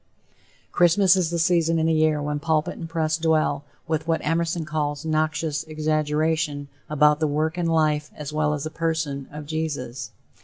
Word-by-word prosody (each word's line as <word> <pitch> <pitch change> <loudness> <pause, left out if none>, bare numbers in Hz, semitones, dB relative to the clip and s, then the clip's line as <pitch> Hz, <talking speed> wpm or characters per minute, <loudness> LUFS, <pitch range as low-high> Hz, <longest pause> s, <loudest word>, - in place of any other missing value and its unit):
Christmas 180 +2 +5
is 180 -4 +1
the 170 - -2
season 165 -1 +2
in 160 - +1
the 165 - +3
year 155 -1 +3
when 145 0 -2
pulpit 155 0 0
and 165 - -7
press 160 -1 0
dwell, 155 -3 +1 0.2
with 160 0 -1
what 165 -1 +1
Emerson 165 +1 0
calls 150 -2 -2
"noxious 155 -1 0
exaggeration," 155 -1 -1 0.2
about 150 0 +4
the 155 - +1
work 155 +2 0
and 175 -2 -1
life, 150 -2 +1
as 150 0 -7
well 150 0 +1
as 145 - -5
the 155 - -4
person 160 -4 -2
of 150 0 -7
Jesus. 145 -6 -4
155 Hz, 175 wpm, -24 LUFS, 150-165 Hz, 0.2 s, Christmas